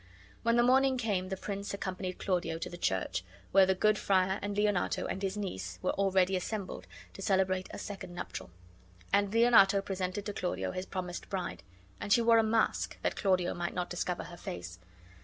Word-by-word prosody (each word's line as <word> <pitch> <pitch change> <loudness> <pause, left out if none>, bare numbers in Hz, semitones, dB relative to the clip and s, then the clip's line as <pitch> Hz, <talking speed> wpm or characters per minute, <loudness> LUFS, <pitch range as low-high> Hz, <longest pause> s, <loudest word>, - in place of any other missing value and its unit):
When 230 0 +2
the 240 - +5
morning 265 +1 +4
came 200 -6 -1
the 190 - -3
prince 200 +1 -4
accompanied 185 -1 -4
Claudio 175 -4 -1
to - - -5
the - - -6
church, 95 - -1 0.3
where 190 -1 +6
the 190 - +3
good 215 +2 +3
friar 190 0 +2
and 205 0 -3
Leonato 205 -3 +1
and 190 - -3
his 195 +1 -2
niece 95 - -4
were - - +2
already 190 -1 +2
assembled, 190 +1 -4 0.3
to - - -9
celebrate 190 -1 +1
a - - -7
second 195 -3 -7
nuptial; 95 - -6 0.6
and 200 0 +3
Leonato 225 -4 +6
presented 195 0 -3
to 205 - -3
Claudio 180 -2 -2
his 185 +1 -5
promised 180 -2 -5
bride. 175 - -3 0.4
And 200 - -5
she 235 +4 +5
wore 230 0 +6
a - - +4
mask, 220 0 +1
that - - 0
Claudio 185 -3 +1
might 175 0 -3
not 180 -1 -2
discover 175 0 -2
her 175 - -10
face. 90 - -7
190 Hz, 190 wpm, -31 LUFS, 180-205 Hz, 0.6 s, where